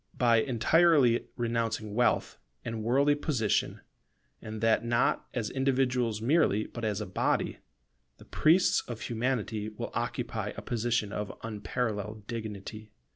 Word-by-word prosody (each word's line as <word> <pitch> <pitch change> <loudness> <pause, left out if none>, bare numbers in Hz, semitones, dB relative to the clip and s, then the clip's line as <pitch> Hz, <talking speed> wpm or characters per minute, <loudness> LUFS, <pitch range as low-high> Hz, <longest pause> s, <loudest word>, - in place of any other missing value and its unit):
By 120 -2 +4
entirely 130 +2 +3
renouncing 115 -3 -2
wealth 120 +3 +1 0.3
and 115 -1 -3
worldly 140 +6 +3
position, 135 -7 0 0.6
and 110 0 -6
that 115 +1 +3
not 120 +1 +1
as 115 -4 -2
individuals 125 -4 0
merely, 120 - +3
but 120 - -8
as 105 -3 -1
a - - -3
body, - - -1 0.6
the - - -15
priests 170 +4 +3
of 120 -2 -6
Humanity 115 -3 -2
will 105 - -6
occupy - - -3
a - - -6
position 115 -3 -1
of 105 -1 -4
unparalleled 110 -1 -3
dignity. 110 -1 -6
115 Hz, 130 wpm, -29 LUFS, 110-125 Hz, 0.6 s, By